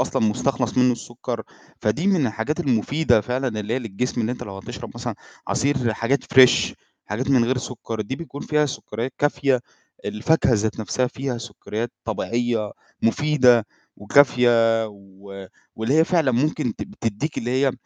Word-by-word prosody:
أصلًا 125 - 0
مستخلص 125 +3 0
منه 125 0 +5
السُكّر، 120 0 -5 0.4
فدي 110 - 0
من 185 -9 +3
الحاجات 115 +9 -2
المفيدة 135 0 +2
فعلًا 125 0 -2
اللي 105 +3 -2
هي 130 - +1
للجسم 120 +2 -3
اللي 115 +1 0
أنت 125 - -7
لو 100 -1 -7
هتشرب 95 - -8
مثلًا - - -4 0.3
عصير 135 -5 +1
حاجات 130 +6 0
Fresh 130 -1 +6 0.3
حاجات 120 +6 -3
من 125 -3 +5
غير 125 +2 0
سُكّر 120 -3 -5
دي 110 +5 -3
بيكون 145 -2 -8
فيها 150 -1 +1
سُكّريات 120 -2 -5
كافية، 140 -3 +2 0.4
الفاكهة 130 +6 +2
ذات 110 +1 -1
نفْسها 125 +5 0
فيها 130 -1 -4
سُكّريات 115 +1 -5
طبيعية 115 -1 -1 0.3
مفيدة 125 -2 +4 0.3
وكافية 115 -1 +4
و 100 -1 -12 0.3
واللي 110 +5 0
هي 160 +1 +6
فعلًا 165 -7 +2
ممكن 130 -1 0
ت - - -5 0.2
تدِّيك 115 +7 -2
اللي 120 - -3
هي 135 -2 +3
120 Hz, 155 wpm, -23 LUFS, 110-135 Hz, 0.4 s, Fresh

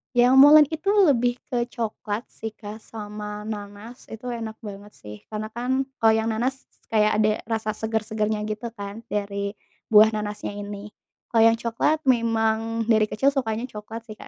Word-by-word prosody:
Yang 245 +1 +5
molen 295 +2 +9
itu 320 +5 -5 0.2
lebih 245 -3 +2 0.2
ke 240 -1 0
coklat 220 -2 -4
sih 220 -1 -7
Kak, 210 0 -9
sama 210 -1 -7
nanas 210 +2 -8
itu 245 +3 -7
enak 225 -2 -5
banget 205 0 -9
sih 105 0 -10
karena 215 0 -5
kan 255 +3 -1 0.2
kalau 225 -1 +5
yang 220 0 0
nanas 255 +5 -2 0.2
kayak 215 -1 +3
ada 215 0 +4
rasa 220 -1 -2
segar-segarnya 215 -1 -2
gitu 215 +2 -4
kan 205 0 -8
dari 200 -1 -2 0.4
buah 215 0 +7
nanasnya 210 -1 -4
ini. 205 0 -7 0.4
Kalau 225 -1 +3
yang 230 0 +5
coklat, 235 +7 0
memang 225 -2 +1
dari 220 -2 +4
kecil 215 +5 0
sukanya 230 -2 -1
coklat 225 +1 -9
sih 215 - -8
Kak, - - -12
220 Hz, 165 wpm, -24 LUFS, 210-235 Hz, 0.4 s, molen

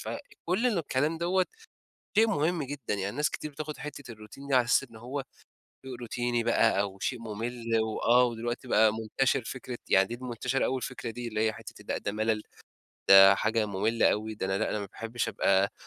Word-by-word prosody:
فكل 225 - -3
الكلام 160 - 0
دوَّة 180 +2 +1 0.7
شيء 225 +1 +6
مهم 160 -3 0
جدًا، 135 -5 -4
يعني 100 +2 -3
ناس 150 +1 +1
كتير 155 - -6
بتاخد 150 +1 -6
حتة 145 -4 -8
الروتين 110 +5 -12
دي 140 - -2
على 125 -2 +4
أساس 120 - +3
إن 115 - -16
هو 130 +5 -5 0.6
شيء 130 - -7
روتيني 120 0 -1
بقى 115 -3 +3
أو 100 -1 -5
شيء 125 +3 -2
ممل 115 +1 -2
و 110 -1 -3
آه 120 0 +4
دلوقتي 120 +2 -4
بقى 110 -2 +5
منتشر 125 +3 0
فكرة 125 0 -6
يعني 95 0 +5
دي 120 - -6
منتشرة 125 +2 -1
أوي 130 - 0
الفكرة 125 -1 -5
دي، 120 +1 -6
اللي 110 -1 -2
هي 110 - -1
حتة 110 0 -11
لأ - - 0
ده - - -3
ملل 110 0 0 0.7
ده 95 0 +9
حاجة 110 +1 0
مملة 105 +3 +2
أوي، 110 +1 -3
ده 95 - -3
أنا 95 +1 0
لأ 110 - 0
أنا - - -1
ما 100 - -5
باحبش 115 +4 -4
أبقى 95 0 +2
120 Hz, 195 wpm, -29 LUFS, 110-135 Hz, 0.7 s, ده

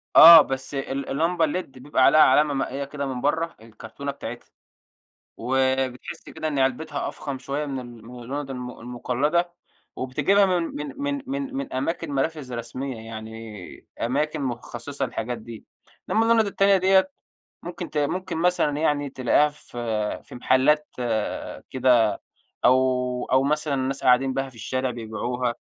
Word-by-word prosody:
آه، 165 -1 +12
بس 135 0 -3
ال 135 0 -3
اللمبة 165 +3 +1
الled 180 +5 -2
بيبقى 130 -1 +1
عليها 155 +3 +6
علامة 150 -1 +5
مائية 135 +1 -2
كده 140 0 -5
من 130 -2 -4
برّه 160 +4 0
الكرتونة 115 +5 -7
بتاعتها، 120 -3 -8 0.9
وبتحس 130 0 -1
كده 155 0 -4
إن 145 -3 -1
علبتها 135 +3 -1
أفخم 140 -3 -5
شوية 140 +3 -3
من 135 -2 -4
ال 120 -3 -11
من 125 0 -10
اللُنض 140 +3 -5
الم 125 -1 -7
المقلدة، 140 +8 -1 0.4
وبتجيبها 195 +10 +2
من 180 -2 +1
من 150 - -5
من 285 0 -2
من 275 0 -3
من 275 - -4
أماكن 150 +3 -2
منافذ 140 -2 -2
رسمية 125 +3 -5
يعني، 110 -2 -9
أماكن 150 +5 -1
مخصصة 120 +2 -4
للحاجات 120 +2 -4
دي. 115 0 -11 0.4
إنما 225 +1 +3
اللُنض 225 -1 +4
التانية 195 0 +3
ديّة 190 +7 +3 0.5
ممكن 175 0 -6
ت 150 - -5
ممكن 170 +4 -1
مثلًا 165 -4 +1
يعني 145 -2 0
تلاقيها 130 +3 +2
في 145 -4 -14 0.5
في - - -12
محلات 140 +5 +3 0.8
كده، 120 -5 +3 0.4
أو 125 -1 +2
أو 130 +1 +5
مثلًا 150 0 0
الناس 135 +1 -2
قاعدين 130 +1 +4
بيها 135 0 -2
في 125 - -16
الشارع 130 +3 -2
ببيعوها. 120 +1 -3
135 Hz, 145 wpm, -24 LUFS, 125-155 Hz, 0.9 s, آه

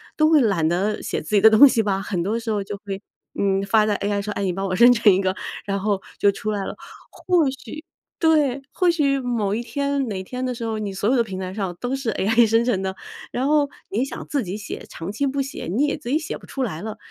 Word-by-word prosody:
都 310 0 +4
会 310 -3 +5
懒 195 -9 +2
得 195 +6 0
写 - - -2
自 185 +7 -2
己 200 - +5
的 220 - +9
东 220 +6 +9
西 235 -4 +2
吧？ 195 -2 0
很 195 -3 -2
多 215 +5 -1
时 230 0 -6
候 205 -2 -1
就 200 - -6
会， 195 -1 -5 0.4
嗯， 195 -1 +2
发 210 +2 +3
在 210 -1 +1
AI 200 0 -1
上， 210 +1 -4
哎， 200 - -3
你 190 - +1
帮 195 +2 -3
我 185 -1 -1
生 240 +4 +7
成 230 -3 +5
一 185 - +2
个， 190 -1 0 0.3
然 200 -1 -1
后 200 -1 0 0.2
就 200 - +4
出 215 +2 -4
来 205 -2 -2
了。 - - -5 0.4
或 350 -5 +1
许 270 +3 -9 0.4
对， 295 -5 +2
或 360 - +2
许 285 -5 +2
某 235 -6 -1
一 225 - -1
天 280 +3 -1
哪 190 -4 -4
天 250 +6 -5
的 255 -1 -2
时 230 - -6
候， 220 -1 -2
你 205 -2 -3
所 195 +2 -2
有 265 - +3
的 240 - +3
平 190 -4 -6
台 185 0 -5
上 190 -4 -3
都 250 +2 -2
是 270 -3 -3
AI 225 +4 +3
生 225 +2 +3
成 225 -6 +1
的， 190 0 -3 0.4
然 255 - -1
后 295 -1 +3 0.2
你 220 +6 0
想 275 - -7
自 280 -4 -1
己 190 +1 -5
写， 210 - -7
长 165 +4 -6
期 280 +7 -1
不 275 +1 -2
写， 270 0 -6
你 220 - +1
也 295 - 0
自 285 -5 -8
己 285 - +3
写 310 - -4
不 - - -16
出 270 - -3
来 170 -9 -4
了。 220 +1 -6
220 Hz, 295 characters per minute, -22 LUFS, 195-265 Hz, 0.4 s, 的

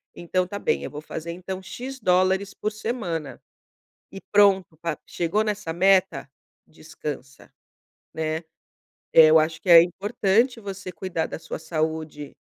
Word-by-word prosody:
então 185 +2 -1
está 200 +3 -6
bem, - - 0
eu - - -6
vou 150 - -7
fazer 160 +2 -6
então 185 +2 -6
X 260 +7 -8
dólares 190 +1 +2
por 215 - -3
semana. 210 - -4 0.7
E 195 - -8
pronto, 195 -5 +4 0.3
chegou 175 +5 -1
nessa 210 -6 -3
meta, 190 -3 +2 0.4
descansa, 150 -3 -9 0.6
né. 160 +1 -2 0.7
Eu 160 0 +8
acho 155 +1 -1
que - - -5
é 170 -1 +11
importante 205 +6 0
você 195 -2 -7
cuidar 180 -4 -3
da - - -6
sua - - -7
saúde 155 -2 -3
180 Hz, 135 wpm, -24 LUFS, 160-200 Hz, 0.7 s, é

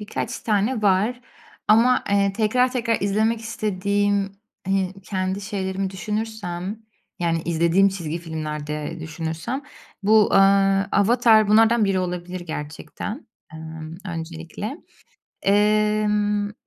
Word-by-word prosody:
birkaç 210 +4 -4
tane 215 +2 0
var 210 +6 +2 0.5
ama, 235 +4 +5
eee, 200 -1 +3
tekrar 250 +5 +2
tekrar 230 -3 0
izlemek 215 +3 +1
istediğim 200 -2 -1 0.4
hi 190 -1 +1
kendi 190 0 -2
şeylerimi 195 -2 -3
düşünürsem, 210 0 -4 0.4
yani 165 -2 0
izlediğim 170 +3 +3
çizgi 170 -4 -4
filmlerde 150 -1 -5
düşünürsem, 160 - -4 0.4
bu, 215 +1 +5
eee, - - +6 0.5
Avatar 220 0 +4
bunlardan 225 +1 +5
biri 195 -1 +1
olabilir 180 0 -4
gerçekten, 160 - -7 0.3
emm, 160 0 -8
öncelikle. 165 - -6 0.7
Emm, 210 0 +2
eee, - - -11
200 Hz, 105 wpm, -23 LUFS, 175-215 Hz, 0.7 s, eee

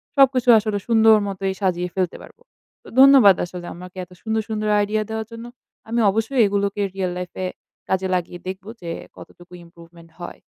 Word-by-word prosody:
সবকিছু 260 -3 +4
আসলে 210 -1 -2
সুন্দর 225 -1 +5
মতই 195 -1 -3
সাজিয়ে 180 -1 -1
ফেলতে 185 -2 -1
পারব। - - -15 0.5
তো - - -17
ধন্যবাদ 265 -8 +8
আসলে 175 0 -9
আমাকে 180 +1 -12
এত 180 - -14
সুন্দর, 220 0 -1
সুন্দর 215 -1 -2
আইডিয়া 210 +1 0
দেওয়ার 220 0 -4
জন্য। 230 +1 -9 0.4
আমি 235 +1 0
অবশ্যই 225 +5 0
এগুলোকে 200 0 -1
রিয়াল 185 -2 -2
লাইফ 180 -1 -6
এ - - -1 0.4
কাজে 190 0 0
লাগিয়ে 175 0 -4
দেখব 190 +1 -6 0.2
যে 170 - -5 0.2
কতটুকু 175 0 -15
ইম্প্রোভমেন্ট 170 0 -17
হয়। 175 - -8
195 Hz, 170 wpm, -21 LUFS, 180-220 Hz, 0.5 s, ধন্যবাদ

